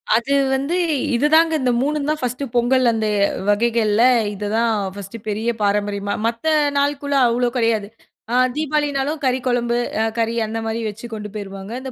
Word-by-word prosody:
அது 235 Hz, +5 st, 0 dB, 0.2 s
வந்து 280 Hz, +6 st, -1 dB, 0.4 s
இதுதாங்க. 315 Hz, +6 st, +4 dB
இந்த 255 Hz, -1 st, +2 dB
3 295 Hz, +1 st, -1 dB
தான் 305 Hz, 0 st, 0 dB
1 250 Hz, +2 st, -2 dB
பொங்கல் 245 Hz, +1 st, +3 dB
அந்த 220 Hz, -1 st, -1 dB, 0.4 s
வகைகள்ல 220 Hz, 0 st, +2 dB, 0.3 s
இதுதான் 215 Hz, +3 st, 0 dB, 0.2 s
1 200 Hz, +2 st, -8 dB
பெரிய 215 Hz, +3 st, -1 dB
பாரம்பரியமா 205 Hz, 0 st, 0 dB
மத்த 230 Hz, +4 st, -4 dB, 0.3 s
நாள்குளா 285 Hz, 0 st, +1 dB
அவ்ளோ 240 Hz, +1 st, +1 dB
கிடையாது. 225 Hz, -3 st, +1 dB, 0.4 s
அ -, -, -2 dB, 0.2 s
தீபாவளினாலும் 295 Hz, -1 st, -1 dB
கறி 260 Hz, -1 st, +1 dB
குழம்பு 240 Hz, -1 st, +1 dB, 0.2 s
அ -, -, +2 dB
கறி 230 Hz, 0 st, 0 dB
அந்த 220 Hz, +1 st, -4 dB
மாரி 225 Hz, +1 st, -2 dB
வச்சி 215 Hz, +3 st, -7 dB
கொண்டு 210 Hz, -1 st, -6 dB
போயிருவாங்க. 195 Hz, -1 st, -7 dB
இந்த 265 Hz, -, -6 dB
235 Hz, 150 wpm, -20 LUFS, 215-275 Hz, 0.4 s, இதுதாங்க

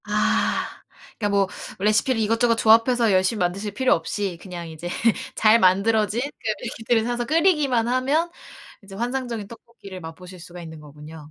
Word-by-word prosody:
아 -, -, 0 dB, 0.4 s
그니까 205 Hz, -2 st, 0 dB
뭐 200 Hz, -1 st, +2 dB, 0.3 s
레시피를 220 Hz, +5 st, +2 dB
이것저것 230 Hz, +2 st, +2 dB
조합해서 230 Hz, +1 st, +4 dB
열심히 190 Hz, +3 st, +2 dB
만드실 195 Hz, +3 st, -2 dB
필요 260 Hz, +1 st, +3 dB
없이 180 Hz, +2 st, -3 dB
그냥 175 Hz, -3 st, -8 dB
이제 160 Hz, +2 st, -7 dB, 0.5 s
잘 220 Hz, +1 st, +5 dB
만들어진 210 Hz, +3 st, +2 dB
그 280 Hz, -4 st, -7 dB, 0.2 s
레시피를 225 Hz, 0 st, 0 dB
사서 240 Hz, +1 st, -2 dB
끓이기만 300 Hz, -7 st, +2 dB
하면 275 Hz, +7 st, +1 dB, 0.5 s
이제 195 Hz, 0 st, -12 dB
환상적인 240 Hz, -1 st, -3 dB
떡볶이를 220 Hz, -4 st, -12 dB
맛보실 180 Hz, +3 st, -10 dB
수가 175 Hz, +1 st, -11 dB
있는 160 Hz, -2 st, -10 dB
거군요. 150 Hz, +1 st, -12 dB
215 Hz, 365 characters per minute, -23 LUFS, 185-240 Hz, 0.5 s, 잘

